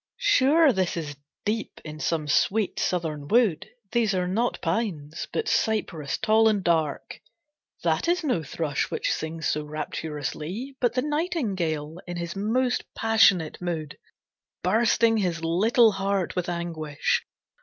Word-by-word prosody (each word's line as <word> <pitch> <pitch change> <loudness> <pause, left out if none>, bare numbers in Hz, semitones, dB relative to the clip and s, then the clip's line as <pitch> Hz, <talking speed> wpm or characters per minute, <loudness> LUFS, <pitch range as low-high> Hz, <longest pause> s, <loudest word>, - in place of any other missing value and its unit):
Sure 310 - +4
this 185 -3 0
is 150 -3 -4 0.3
deep 215 +2 -2
in 155 0 -7
some 155 -1 -1
sweet, 195 +8 +1
southern 155 -5 -2
wood, 215 -8 +2 0.2
These 225 -4 +2
are 180 -1 0
not 225 +7 0
pines, 165 -9 -2
but 450 -1 -2
cypress 180 -9 0
tall 220 +1 +4
and 205 -3 0
dark; 160 -4 -1 0.6
That 160 - +1
is 350 0 +1
no 250 - +1
thrush 150 -1 -2
which - - -1
sings 160 0 -4
so 150 - 0
rapturously, 155 - -5
But 245 -1 +2
the 255 - +1
nightingale 195 - -2
in 175 0 -5
his 170 0 -4
most 245 +5 0
passionate 210 -8 +3
mood 160 -4 -4 0.6
Bursting 225 +3 +3
his 175 -5 -1
little 220 +8 +4
heart 195 -2 -1
with 180 -1 -1
anguish. 165 -4 -1
180 Hz, 135 wpm, -26 LUFS, 160-225 Hz, 0.6 s, Sure